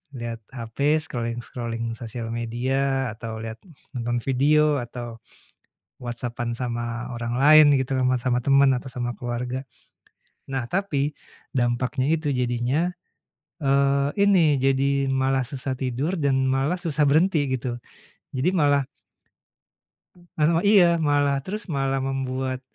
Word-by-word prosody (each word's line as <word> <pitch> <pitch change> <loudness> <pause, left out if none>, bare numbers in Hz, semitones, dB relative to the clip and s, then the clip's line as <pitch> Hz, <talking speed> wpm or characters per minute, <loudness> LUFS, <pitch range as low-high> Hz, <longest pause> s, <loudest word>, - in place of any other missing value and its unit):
lihat 120 -2 -5
hape 135 +5 0
scrolling-scrolling 115 -2 -4
sosial 115 -1 -6
media 130 +3 -1
atau 110 -1 -6
lihat 110 0 -6 0.4
nonton 120 0 -1
video 150 +3 +3
atau 120 -1 -7 0.8
WhatsApp-an 120 -1 -4
sama 120 -1 -3
orang 120 0 -3
lain 155 +2 +8
gitu 130 +1 -2 0.3
sama 125 0 0
temen 135 +1 +4
atau 125 +2 -5
sama 120 -1 -3
keluarga. 125 +3 -4 0.9
Nah, 135 -2 -2
tapi 155 -7 0 0.4
dampaknya 125 +2 0
itu 155 -2 -2
jadinya, 125 +5 0 0.7
eee, 140 0 +2 0.2
ini 170 -7 +4
jadi 135 0 +2
malah 135 0 +1
susah 135 +1 -4
tidur 130 +6 -2
dan 135 -4 +1
malah 135 +7 +1
susah 155 -3 0
berhenti 155 +2 +3
gitu. 120 0 -4 0.6
Jadi 140 +8 +1
malah 145 -6 +3 1.5
Masama 165 +2 +2
iya! 180 -5 +6
Malah 145 -2 +2
terus 210 +3 -5
malah 135 -2 0
membuat 130 -1 -2
135 Hz, 115 wpm, -24 LUFS, 120-145 Hz, 1.5 s, lain